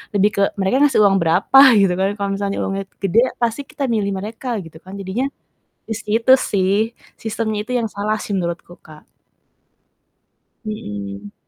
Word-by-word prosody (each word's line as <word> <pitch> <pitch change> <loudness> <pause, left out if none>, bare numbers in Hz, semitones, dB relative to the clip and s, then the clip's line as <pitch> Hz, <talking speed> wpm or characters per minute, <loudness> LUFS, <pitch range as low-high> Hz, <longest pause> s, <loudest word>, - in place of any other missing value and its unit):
lebih 205 +1 +3
ke 200 - +2 0.2
mereka 190 +5 +1
ngasih 270 - +3
uang 195 -1 +4
berapa, 180 +11 +5
gitu 195 -3 +4
kan. 190 +1 +2
Kalau 200 0 -2
misalnya 200 0 -2
uangnya 195 0 -2 0.2
gede, 200 +5 +4 0.2
pasti 235 +3 0
kita 280 -4 -3
milih 205 -3 0
mereka, 225 +5 -4
gitu 160 -1 -13
kan. 190 +3 -11
Jadinya 200 +7 -2 0.6
di 225 - -5
situ 225 +3 +1
sih, 200 +4 0 0.2
sistemnya 220 -1 -2
itu 250 - -6
yang 230 -2 -1
salah 210 +2 -1
sih, 210 - -6
menurutku, 175 -1 -5
Kak. 155 -1 -15 1.6
Mhm. 100 - -6
200 Hz, 155 wpm, -19 LUFS, 190-225 Hz, 1.6 s, berapa